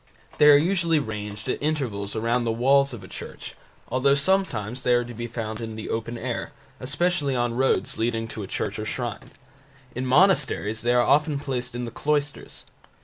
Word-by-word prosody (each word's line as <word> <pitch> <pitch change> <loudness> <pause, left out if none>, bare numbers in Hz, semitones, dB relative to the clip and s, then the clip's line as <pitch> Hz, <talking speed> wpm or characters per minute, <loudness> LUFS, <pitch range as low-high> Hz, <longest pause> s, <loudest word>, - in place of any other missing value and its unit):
They 150 - +8
are 145 - +9
usually 170 0 +2
ranged 105 -4 -4
at - - -2
intervals 120 -10 -2
around 115 +2 +1
the 115 - 0
walls 135 +4 +3
of 115 -6 -8
a - - -10
church, - - -8 0.4
though 140 +2 +3
sometimes 140 - 0
they 125 -1 +3
are 120 0 +1
to 120 - -8
be 120 +1 -5
found 110 -1 -5
in 110 -1 -5
the 110 - -6
open 115 +1 -3
air, 120 0 -4 0.3
especially 145 +1 0
on 120 -1 0
roads 120 -6 +1
leading 115 0 0
to 110 - -6
a 100 - -6
church 100 +2 -3
or 105 - -3
shrine. 120 -1 -4 0.6
In 130 +1 -3
monasteries 135 - +3
they 120 +1 +2
are 120 - +5
often 150 +3 +3
placed 125 -3 -4
in 120 0 -3
the 115 - -6
cloisters. 145 +2 -2
120 Hz, 190 wpm, -25 LUFS, 115-140 Hz, 0.6 s, are